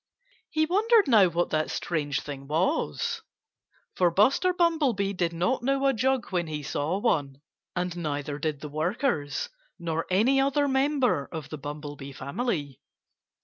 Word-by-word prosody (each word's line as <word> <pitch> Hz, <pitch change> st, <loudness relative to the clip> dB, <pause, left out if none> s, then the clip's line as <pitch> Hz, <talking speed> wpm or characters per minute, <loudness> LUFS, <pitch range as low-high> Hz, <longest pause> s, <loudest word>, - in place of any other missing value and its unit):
He 315 Hz, 0 st, +2 dB
wondered 420 Hz, +3 st, +4 dB
now 215 Hz, -7 st, +6 dB
what 175 Hz, 0 st, -1 dB
that 155 Hz, 0 st, 0 dB
strange 145 Hz, -4 st, -2 dB
thing 140 Hz, -2 st, -8 dB
was; 190 Hz, -, 0 dB, 0.7 s
for 180 Hz, -1 st, +3 dB
Buster 235 Hz, -, +3 dB
Bumblebee 295 Hz, -, +1 dB
did 175 Hz, -3 st, 0 dB
not 180 Hz, +11 st, 0 dB
know 275 Hz, +2 st, +1 dB
a 270 Hz, -, +4 dB
jug 260 Hz, 0 st, 0 dB
when 175 Hz, -3 st, 0 dB
he 150 Hz, -1 st, -4 dB
saw 150 Hz, +5 st, -1 dB
one. 145 Hz, -, 0 dB, 0.4 s
And 180 Hz, -1 st, -2 dB
neither 145 Hz, -3 st, -3 dB
did 150 Hz, -2 st, -2 dB
the 150 Hz, -, -6 dB
workers, 160 Hz, -, -1 dB, 0.3 s
nor 165 Hz, -2 st, -3 dB
any 235 Hz, +9 st, +4 dB
other 280 Hz, +1 st, +2 dB
member 265 Hz, -, +1 dB
of 160 Hz, -4 st, -6 dB
the 155 Hz, -, -6 dB
Bumblebee 145 Hz, -1 st, -7 dB
family. 145 Hz, -, -3 dB
180 Hz, 145 wpm, -27 LUFS, -, 0.7 s, now